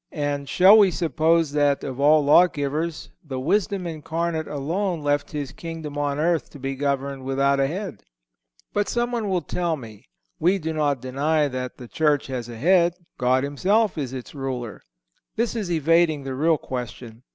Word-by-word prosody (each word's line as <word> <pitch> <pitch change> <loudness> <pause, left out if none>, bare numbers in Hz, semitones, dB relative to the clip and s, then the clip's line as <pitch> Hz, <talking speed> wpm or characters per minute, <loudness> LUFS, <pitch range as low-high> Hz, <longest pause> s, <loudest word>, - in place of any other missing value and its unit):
And 145 -1 -2
shall 195 +4 +7
we 200 -2 +6
suppose 165 -1 +1
that, 145 -1 +2
of 130 -1 -5
all 150 +1 +5
lawgivers, 155 0 +2
the 135 -5 -5
Wisdom 190 +5 0
Incarnate 165 0 -3
alone 165 +4 -2
left 145 0 0
His 145 -3 -4
Kingdom 165 -3 -7
on 145 -1 -1
earth 165 +1 0
to 145 - -13
be 135 +1 -3
governed 140 -1 -2
without 140 +1 +1
a 135 - +3
head? 180 - -5 0.7
But 205 0 0
someone 240 -3 -1
will 180 -3 0
tell 170 +1 -1
me: 110 -3 -12 0.3
"We 180 +5 +3
do 160 -3 -3
not 145 -4 0
deny 145 +4 +1
that 125 -1 -5
the 125 - -10
Church 150 +1 +1
has 125 -3 -5
a 115 - -8
head. 175 +5 +3 0.2
God 130 +1 +2
himself 195 +9 +1
is 140 -5 -3
its 130 -2 -7
Ruler." 130 -5 -5 0.5
This 235 +2 -1
is 210 -6 -3
evading 165 -2 +2
the 135 -1 -4
real 155 +4 +2
question. 120 -3 -7
150 Hz, 170 wpm, -24 LUFS, 135-170 Hz, 0.7 s, shall